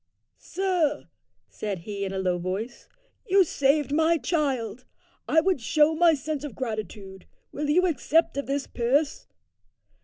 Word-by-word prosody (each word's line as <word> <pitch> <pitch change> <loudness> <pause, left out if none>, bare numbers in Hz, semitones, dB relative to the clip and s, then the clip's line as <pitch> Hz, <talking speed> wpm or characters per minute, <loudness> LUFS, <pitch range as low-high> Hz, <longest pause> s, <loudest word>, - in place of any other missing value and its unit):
"Sir," 355 -6 -1 0.4
said 200 -5 -5
he 200 +2 -5
in 195 - -3
a 195 - -4
low 180 -2 0
voice, 195 +7 -5 0.4
"you 390 0 +5
saved 285 -2 +1
my 320 +3 +3
child. 255 - -2 0.4
I 320 - +4
would 365 -6 0
show 300 +7 +3
my 330 0 +4
sense 295 +1 -4
of 295 - -7
gratitude. 215 -5 -6 0.2
Will 295 +1 -3
you 360 +5 +4
accept 325 0 +1
of 280 - -3
this 275 0 -1
purse?" 275 +6 0
280 Hz, 145 wpm, -26 LUFS, 220-320 Hz, 0.4 s, you